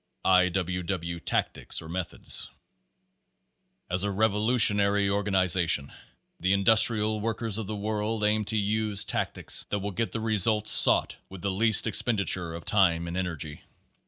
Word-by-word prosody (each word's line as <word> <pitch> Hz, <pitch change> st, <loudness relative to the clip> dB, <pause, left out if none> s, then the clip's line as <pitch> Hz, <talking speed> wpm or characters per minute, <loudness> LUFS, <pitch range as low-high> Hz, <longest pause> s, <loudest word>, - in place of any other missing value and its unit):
I. 90 Hz, -1 st, +3 dB
W. 90 Hz, 0 st, -4 dB
W. 85 Hz, -1 st, -5 dB
Tactics -, -, -4 dB
or 80 Hz, -, -11 dB
Methods 90 Hz, +2 st, -3 dB, 1.4 s
As 90 Hz, +1 st, -1 dB
a 100 Hz, -, -2 dB
revolutionary 105 Hz, -1 st, +3 dB
organization 95 Hz, -7 st, 0 dB, 0.5 s
the 95 Hz, +3 st, 0 dB
Industrial 110 Hz, +1 st, +3 dB
Workers 115 Hz, -1 st, -3 dB
of 110 Hz, -, -6 dB
the 110 Hz, -, -5 dB
World 105 Hz, +1 st, -4 dB
aims 105 Hz, 0 st, 0 dB
to 110 Hz, -, -1 dB
use 105 Hz, 0 st, 0 dB
tactics -, -, -1 dB
that 105 Hz, -, -2 dB
will 100 Hz, +1 st, -5 dB
get 115 Hz, +4 st, -4 dB
the 115 Hz, -, -5 dB
results 110 Hz, -1 st, +2 dB
sought -, -, +5 dB
with 95 Hz, -1 st, -12 dB
the 100 Hz, -, -2 dB
least 110 Hz, +3 st, +3 dB
expenditure 100 Hz, -6 st, +1 dB
of 85 Hz, -, -10 dB
time 85 Hz, -5 st, +1 dB
and 85 Hz, -, -7 dB
energy. 80 Hz, -5 st, -6 dB
100 Hz, 145 wpm, -26 LUFS, 90-110 Hz, 1.4 s, sought